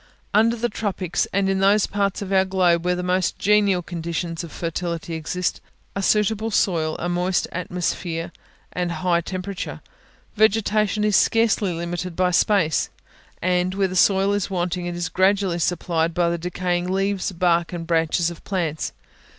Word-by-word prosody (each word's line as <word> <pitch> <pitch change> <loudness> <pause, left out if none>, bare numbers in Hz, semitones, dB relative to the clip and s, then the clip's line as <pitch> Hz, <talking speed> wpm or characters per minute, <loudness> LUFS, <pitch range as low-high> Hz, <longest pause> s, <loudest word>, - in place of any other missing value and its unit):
Under 225 +3 +4
the 240 +1 -1
tropics, 195 -5 -2
and 195 0 +1
in 195 0 +1
those 200 +1 +4
parts 200 0 -1
of 195 0 -4
our 190 0 +5
globe 180 -3 +2
where 180 0 +1
the 180 - -3
most 180 0 0
genial 200 -3 +3
conditions 170 0 -4
of 165 - -8
fertility 170 0 -4
exist, 160 +3 -2 0.3
a 195 - -1
suitable 215 +2 +1
soil, 165 -7 +1
a 175 - -3
moist 180 +1 0
atmosphere, 175 -1 -3 0.4
and 180 -1 -1
a - - -3
high 175 -2 +1
temperature, 185 +2 -5 0.6
vegetation 215 0 +2
is 210 -1 +2
scarcely 225 -4 +3
limited 175 +1 -4
by 180 0 +2
space; 175 -3 +2 0.5
and, 180 +1 +1
where 195 -1 +2
the 185 - -6
soil 195 +1 +4
is 205 -1 -1
wanting, 180 -1 -2
it 175 - -4
is 175 0 -2
gradually 190 0 +2
supplied 170 -1 0
by 170 -1 +2
the 170 - -1
decaying 180 +1 -2
leaves, 195 0 0
bark 170 -1 +1
and 170 -2 -5
branches 165 +1 +1
of 170 - -12
plants. 165 -6 -2
180 Hz, 165 wpm, -23 LUFS, 170-195 Hz, 0.6 s, our